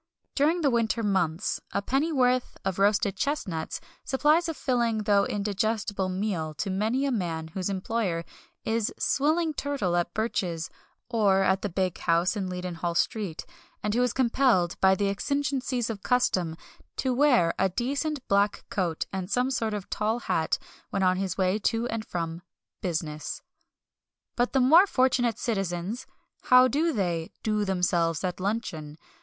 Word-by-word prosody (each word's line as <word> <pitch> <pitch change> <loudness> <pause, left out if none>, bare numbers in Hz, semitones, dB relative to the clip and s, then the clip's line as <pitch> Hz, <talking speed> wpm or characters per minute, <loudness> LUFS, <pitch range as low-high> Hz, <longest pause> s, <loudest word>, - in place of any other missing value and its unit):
During 315 +5 +2
the 280 -4 +3
winter 230 -1 +1
months 190 -3 0
a - - +1
pennyworth 260 -2 +1
of 190 -1 -1
roasted 200 -1 +3
chestnuts 190 - -2 0.2
supplies 305 +5 +2
a 325 - -3
filling, 235 -5 0
though 200 -1 +3
indigestible 205 -1 -1
meal 185 -5 -2
to 195 +6 -2
many 220 +8 0
a 275 - 0
man 165 -8 -2
whose 185 +3 -3
employer 190 -3 -1 0.4
is 225 -1 0
swilling 310 +3 +1
turtle 275 -12 -1
at 175 0 0
Birch's 180 -7 -2 0.4
or 205 -5 +3
at 190 0 +2
the 205 - -2
big 185 0 -1
house 170 +5 +2
in 195 -3 -2
Leadenhall 180 -2 -3
Street, 190 -2 -1 0.4
and 210 0 0
who 240 - +2
is 250 -1 +2
compelled, 235 -8 +2
by 190 0 +6
the 200 +1 0
exigencies 260 +2 -1
of 215 -4 -5
custom, 185 -10 +1 0.4
to 260 -1 0
wear 245 -11 +4
a 190 +1 +3
decent 275 - -2
black 200 +1 +1
coat 175 -5 -1
and 190 -1 -3
some 250 +4 +1
sort 225 -4 -1
of 200 -2 -6
tall 215 +2 0
hat 160 -7 0 0.3
when 195 - -1
on 185 0 +3
his 190 -1 -2
way 190 +2 +1
to 225 +2 0
and 225 0 -4
from 165 -1 -4 0.4
"business." 155 -4 -3 0.9
But 245 +1 0
the 270 - +4
more 325 +10 +7
fortunate 250 - +2
citizens 195 +2 -2 0.4
how 255 0 +7
do 310 +7 +1
they 175 - -1
"do 215 -1 +1
themselves" 175 -3 +1
at 180 -1 -2
luncheon? 180 -7 -3
205 Hz, 155 wpm, -27 LUFS, 180-250 Hz, 0.9 s, more